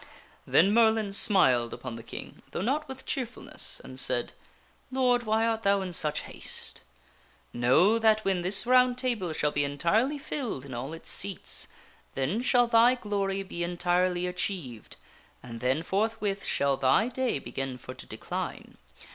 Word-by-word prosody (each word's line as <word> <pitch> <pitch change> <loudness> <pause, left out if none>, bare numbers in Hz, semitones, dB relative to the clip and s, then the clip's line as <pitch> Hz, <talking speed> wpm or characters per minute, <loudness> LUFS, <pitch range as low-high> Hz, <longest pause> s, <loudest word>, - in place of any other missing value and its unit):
Then 195 +5 +4
Merlin 220 -3 +3
smiled 130 - +3
upon 125 -3 -7
the 115 - -8
King, - - -9
though - - -4
not 295 +7 0
with 265 0 -8
cheerfulness, 250 -2 -2
and - - -8
said, - - +2 0.3
" - - -34
Lord, 250 -2 +2
why 220 +1 +2
art 225 -1 0
thou 200 -1 +2
in 180 -2 -5
such 150 -2 0
haste? - - -4 0.7
Know 160 - +4
that 220 -1 +3
when 190 -2 +1
this 190 +5 +3
Round 250 0 +4
Table 235 -9 -1
shall 150 -1 0
be 145 - 0
entirely 170 - +1
filled 260 - -5
in 135 - -9
all 130 +6 -5
its 165 - -5
seats, 195 -1 -1 0.5
then 145 - -1
shall 245 -1 +4
thy 235 +1 +5
glory 200 -4 -2
be 175 -2 -5
entirely 175 +1 0
achieved 180 - -4 0.5
and 115 -2 -8
then 130 +6 0
forthwith 200 +1 -1
shall 140 -1 +1
thy 135 - +3
day 255 - -1
begin 135 -1 -5
for 130 - -9
to 130 - -12
decline. - - -6
195 Hz, 160 wpm, -28 LUFS, 145-230 Hz, 0.7 s, thy